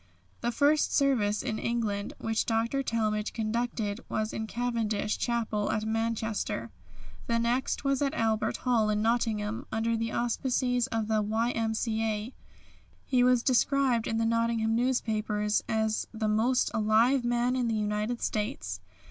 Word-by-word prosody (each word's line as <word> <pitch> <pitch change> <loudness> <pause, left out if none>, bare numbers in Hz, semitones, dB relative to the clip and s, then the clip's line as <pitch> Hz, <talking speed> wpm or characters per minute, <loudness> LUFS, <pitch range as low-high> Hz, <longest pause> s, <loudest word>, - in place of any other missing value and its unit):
The 240 - -1
first 290 +5 +2
service 230 -7 +2
in 220 - -2
England 215 -4 -2
which 225 0 -1
Dr. 230 +4 +1
Talmage 215 -4 -1
conducted 225 -1 -2
was 215 0 -2
in 220 0 -3
Cavendish 225 -3 -1
Chapel 225 -4 -1
at 215 0 -1
Manchester. 220 - -2 0.6
The 235 - +2
next 240 +5 0
was 275 -1 +1
at 280 -1 0
Albert 220 -1 0
Hall 230 -4 +3
in 210 0 +1
Nottingham, 225 -2 0
under 225 +1 0
the 230 0 -2
auspices 245 +1 0
of 225 -3 -2
the 220 -1 +2
Y.M.C.A. 220 0 -1 0.7
He 250 -2 +3
was 250 -1 +4
described 260 -2 +2
in 225 - -1
the 225 - +1
Nottingham 230 -1 +1
newspapers 215 -4 0
as 220 0 0
the 220 -1 -2
"most 230 +4 +2
alive 225 +5 +3
man 240 +1 +1
in 250 -2 0
the 225 - 0
United 210 +2 -1
States." 95 - -2
225 Hz, 140 wpm, -29 LUFS, 215-240 Hz, 0.7 s, was